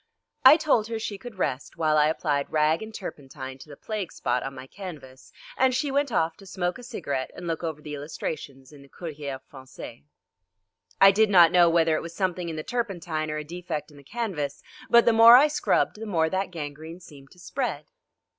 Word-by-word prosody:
I 310 - +9
told 260 -9 +1
her 230 -1 -3
she 210 -2 -5
could 240 -3 -10
rest 140 -7 -3
while 155 -1 +2
I 150 0 +5
applied 150 -3 -1
rag 155 +1 +2
and 220 0 -7
turpentine 135 -9 -8
to 150 - -13
the 145 - -11
plague 210 -5 -5
spot 125 0 -1
on 135 0 -6
my 130 0 -9
canvas, 140 -6 -11 0.2
and 260 -1 +2
she 275 +2 -1
went 280 -1 0
off 160 -5 +1
to 195 - -15
smoke 180 +4 -3
a - - -11
cigarette 140 - -4
and 180 - -8
look 165 0 -3
over 155 -2 -4
the 150 - -7
illustrations 140 -2 -6
in 145 -2 -14
the 140 - -17
Courrier 145 -5 -6
Français. 130 - -11 1.0
I 195 0 +9
did 215 +2 +3
not 175 -4 +7
know 175 -1 +6
whether 165 -1 +3
it - - -2
was 170 +1 -9
something 180 -3 -2
in 160 - -5
the 155 - -5
turpentine 175 -10 -3
or 155 - -3
a 150 - -4
defect 165 -1 -6
in 145 - -16
the 140 - -15
canvas, 175 - -4 0.3
but 235 0 +6
the 235 - +5
more 230 +1 +9
I 285 +4 +6
scrubbed 295 -7 0
the 225 - -5
more 160 -5 +1
that 190 0 -1
gangrene 160 0 -7
seemed 140 -6 -15
to - - -20
spread. 215 - -4
165 Hz, 210 wpm, -26 LUFS, 145-200 Hz, 1.0 s, I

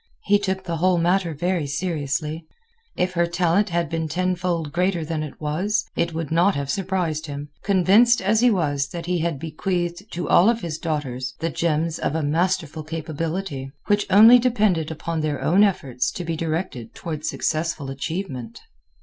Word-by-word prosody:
He 205 0 +3
took 190 -1 -2
the 170 -3 -3
whole 180 +2 +3
matter 175 -1 +1
very 175 -1 -1
seriously. 155 0 -2 0.5
If 180 0 0
her 170 -1 +2
talent 175 +4 +1
had 170 -1 0
been 160 +1 -2
ten 180 +3 0
fold 170 -4 -2
greater 180 0 0
than 155 0 -2
it 155 -2 -7
was, 190 +9 -1
it 170 - 0
would 160 -2 -4
not 175 +5 +3
have 140 -1 -2
surprised 175 -4 -2
him, 145 0 -6
convinced 200 +5 +4
as 205 +3 +2
he 245 +1 +5
was 145 -9 0
that 170 +2 -7
he 180 0 0
had 165 -2 -1
bequeathed 175 +5 -3
to 175 0 -3
all 190 +6 +6
of 235 -1 0
his 160 -2 -4
daughters 130 -5 -3
the 165 0 -2
germs 165 0 0
of 150 - -1
a 160 - 0
masterful 160 0 0
capability, 160 -2 -4
which 205 0 +1
only 220 +5 +8
depended 210 -10 +1
upon 160 +1 -3
their 150 -2 -1
own 185 +6 +4
efforts 135 - 0
to 180 - -5
be 165 -1 -2
directed 155 -7 -3
toward 155 -3 -5
successful 155 -4 -2
achievement. 135 - -5
170 Hz, 175 wpm, -23 LUFS, 155-185 Hz, 0.5 s, only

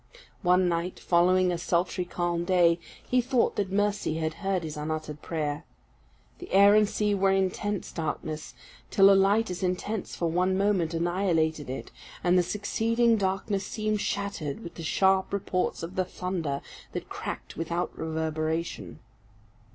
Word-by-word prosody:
One 180 -1 +4
night, 170 +1 -2
following 180 +1 +3
a 175 - -2
sultry 180 +1 0
calm 175 -1 -1
day, 175 -2 +4 0.3
he 250 0 +3
thought 250 -1 +1
that 200 -2 -1
Mercy 205 -5 0
had 160 0 -1
heard 195 -3 0
his 155 -1 -5
unuttered 155 0 -4
prayer. 150 -2 -3 0.8
The 360 - -10
air 200 +1 +7
and 210 -1 +4
sea 210 -1 0
were 195 -1 +2
intense 195 +1 0
darkness, 155 -1 -4 0.3
till 195 0 +6
a - - +7
light 195 +2 +3
as 180 - -5
intense 185 +3 -2
for 170 - -2
one 180 +3 +1
moment 190 -5 +1
annihilated 165 -4 0
it, 130 - -6 0.3
and 180 0 +4
the 180 - +6
succeeding 230 +5 +1
darkness 195 0 -1
seemed 215 -2 -1
shattered 200 -5 -3
with 170 - -8
the - - -9
sharp 190 +3 +2
reports 190 -3 -1
of 170 +3 -6
the 185 - +1
thunder 175 -6 -3 0.3
that - - -5
cracked - - -6
without 170 +2 -2
reverberation. 160 +1 -3
180 Hz, 150 wpm, -28 LUFS, 165-200 Hz, 0.8 s, air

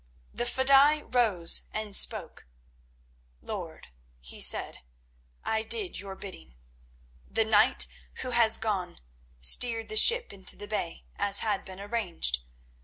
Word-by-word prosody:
The 240 - -5
fedaï 275 +4 +1
rose 210 -9 +2
and 215 -2 -4
spoke. - - +1 0.9
"Lord," - - -11 0.3
he - - -10
said, - - +3 0.6
"I 220 0 -3
did 395 - -2
your 195 -1 -10
bidding. 65 - -13 0.7
The 225 - -2
knight 215 -1 +2 0.4
who 255 - -6
has 235 -2 +4
gone 190 -5 -6 0.4
steered 225 - +4
the 435 - -7
ship 475 +2 +6
into 190 -2 -1
the 205 - -12
bay, 190 -6 -7
as 200 0 -1
had 210 -3 -4
been 190 0 -12
arranged. 200 - -2
215 Hz, 125 wpm, -25 LUFS, 190-245 Hz, 0.9 s, ship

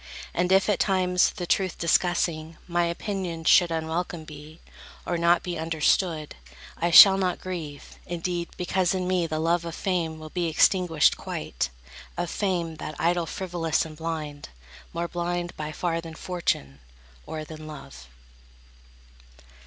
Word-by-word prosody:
And 180 +1 0
if, 190 0 +5
at 205 -3 +1
times, 185 -2 +3
The 180 - -5
truth 185 +1 0
discussing, 170 -2 +1
my 175 -1 +1
opinions 170 -2 -3
should 175 -2 +6
Unwelcome 165 +1 -3
be, 155 +1 -12 0.5
or 175 - -1
not 170 +1 +3
be 175 -2 -4
understood, 160 0 +1 0.4
I 170 - 0
shall 195 +3 +10
not 185 -2 0
grieve, 165 -6 -7
indeed, 175 0 -3
because 180 0 +1
in 185 -1 -2
me 180 -2 +1
The 155 -1 -3
love 165 +2 +1
of 170 -1 -6
fame 170 -4 -1
will 155 0 -10
be 175 -2 -1
extinguished 165 -2 +3
quite; - - -3 0.5
Of 175 -1 -2
fame, 175 -5 -1
that 155 - -6
idol 170 0 +1
frivolous 170 -3 -1
and 155 -1 -9
blind; 155 -2 -5 0.4
More 170 +1 -2
blind 175 0 -3
by 155 0 -5
far 165 +1 -2
than 165 -1 -9
Fortune, 150 - -2 0.5
or 155 -1 -5
than 155 0 -10
Love. 65 - -10
170 Hz, 145 wpm, -26 LUFS, 160-180 Hz, 0.5 s, shall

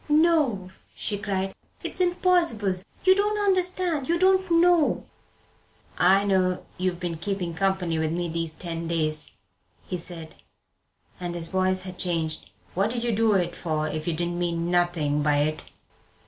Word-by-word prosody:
"No," 295 - +3 0.2
she 205 - -1
cried, 195 -2 -2 0.3
"it's - - -5
impossible! 350 - +2 0.3
You 375 - +8
don't 415 +1 +1
understand! 365 -6 0
You 340 - +3
don't 375 +1 +3
know!" 335 -2 +3 0.9
"I 190 +3 +4
know 185 -2 +1
you've 185 -1 -1
been 175 -2 -3
keeping 180 -1 -3
company 180 -2 0
with 160 0 0
me 175 +1 -1
these 165 -1 -1
ten 165 -1 -4
days," 155 -2 +1 0.6
he 180 - -3
said, 165 -2 -6 0.9
and 175 -1 -4
his 170 -1 -3
voice 185 +1 0
had 185 -1 -8
changed. 165 -3 -1 0.2
"What 195 +4 +1
did 235 0 -2
you 240 - +1
do 220 0 +3
it 175 -3 0
for 155 -2 -1
if 155 +1 -4
you 170 - +1
didn't 175 +1 -2
mean 170 0 -1
nothing 170 -5 +1
by 145 0 +2
it?" 155 +2 0
185 Hz, 155 wpm, -25 LUFS, 170-240 Hz, 0.9 s, You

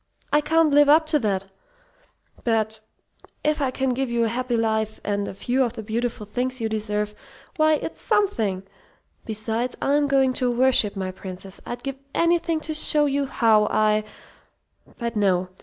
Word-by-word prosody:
I 295 - +5
can't 320 +1 +3
live 290 0 +6
up 315 +2 +6
to 300 - +5
that, 195 -5 -1 1.0
but 220 -2 +1 0.6
if 300 0 +1
I 270 - +1
can 265 +1 -1
give 260 +1 -1
you 235 0 +1
a 225 - +1
happy 245 +1 -1
life, 220 -1 -1
and 205 0 -1
a - - -6
few 250 +6 0
of 240 - -2
the 220 - -7
beautiful 225 0 -3
things 255 +4 -2
you 225 - -1
deserve, 210 -1 -2 0.4
why, 310 -1 +4
it's 305 - -5
something! 230 - +1 0.6
Besides, 225 +3 -2
I'm 285 +1 +2
going 270 -2 +3
to 250 - +2
worship 240 -4 +2
my 190 -1 -3
princess. 185 +1 -8
I'd 240 0 -6
give 275 -1 -4 0.2
anything 335 -1 +2
to 315 - -4
show 300 -1 +4
you 280 0 0
how 220 -4 +3
I 215 0 +2 0.9
but 235 -1 -4
no. 185 -3 +1
235 Hz, 170 wpm, -23 LUFS, 215-280 Hz, 1.0 s, live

